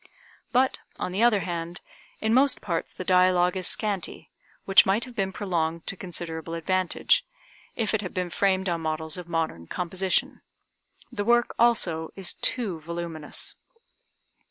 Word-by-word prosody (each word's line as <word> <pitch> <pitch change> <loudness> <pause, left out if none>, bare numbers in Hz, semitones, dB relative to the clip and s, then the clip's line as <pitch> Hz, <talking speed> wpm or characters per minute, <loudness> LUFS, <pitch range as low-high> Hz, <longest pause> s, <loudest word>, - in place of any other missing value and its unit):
But, 260 +1 +2 0.2
on 180 - -3
the 195 +4 -1
other 235 -4 +5
hand, 170 0 -4 0.4
in 220 +1 +2
most 270 +2 +5
parts 170 -4 -3
the - - -6
dialogue 180 -1 +4
is 185 -1 -1
scanty, 200 -6 -1 0.3
which 195 - +7
might 200 +6 +1
have 250 -2 -12
been 195 -1 0
prolonged 170 -5 -2
to - - +3
considerable 165 -3 -6
advantage, 185 +2 +2 0.5
if 225 -2 0
it 220 - +1
had 185 - -5
been 180 -1 -3
framed 190 0 +1
on 170 -2 -1
models 160 0 -2
of 175 -1 -9
modern 160 - -2
composition. 185 +1 -1 0.7
The 205 - -2
work, 240 +2 +3
also, 175 -9 +2
is 190 -2 -2
too 210 -10 0
voluminous. 165 -1 -5
180 Hz, 150 wpm, -26 LUFS, 165-200 Hz, 0.7 s, which